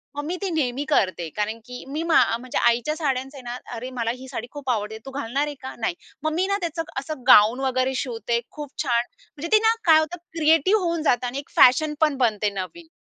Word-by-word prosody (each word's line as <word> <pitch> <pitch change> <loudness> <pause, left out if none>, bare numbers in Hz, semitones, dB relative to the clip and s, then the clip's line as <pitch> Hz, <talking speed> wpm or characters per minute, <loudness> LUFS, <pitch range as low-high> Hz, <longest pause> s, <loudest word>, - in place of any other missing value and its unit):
मग 290 - -3
मी 350 +3 -2
ती 390 - -1
नेहमी 280 -3 -1
करते. 185 - +1
कारण 215 +2 -2
की 250 0 -8
मी, 300 +4 -3
मा 335 -1 +3 0.2
म्हणजे 255 +1 -5
आईच्या 240 +6 +2
साड्यांचे 270 -3 -2
ना 240 0 -6 0.2
अरे, 250 +3 -6
मला 230 -1 0
ही 260 +1 -11
साडी 245 -3 -6
खूप 285 -3 -7
आवडते, 220 -2 -1
तू 270 - -7
घालणार 275 +2 -1
आहे 295 -1 -6
का? 260 - -6
नाही. 350 -1 -1 0.3
मग 310 0 0
मी 370 +4 +1
ना 400 0 +1
त्याचं 330 -1 -2 0.2
असं 275 -2 -7
गाउन 220 +5 +7
वगैरे 260 0 0
शिवते 235 -2 -1
खूप 295 -2 -8
छान. 240 -3 +2 0.3
म्हणजे 330 +4 -4
ती - - +3
ना, 450 +1 +5
काय 320 -2 +7
होतं, 315 +3 -2 0.2
क्रिएटिव्ह 325 +6 +4
होऊन 335 -2 -1
जातं 245 -3 +2
आणि 265 +3 -4
एक 285 - -10
फॅशन 300 +5 +6
पण 300 -3 +3
बनते 215 -4 +1
नवीन. 200 - -7
270 Hz, 220 wpm, -24 LUFS, 240-310 Hz, 0.3 s, गाउन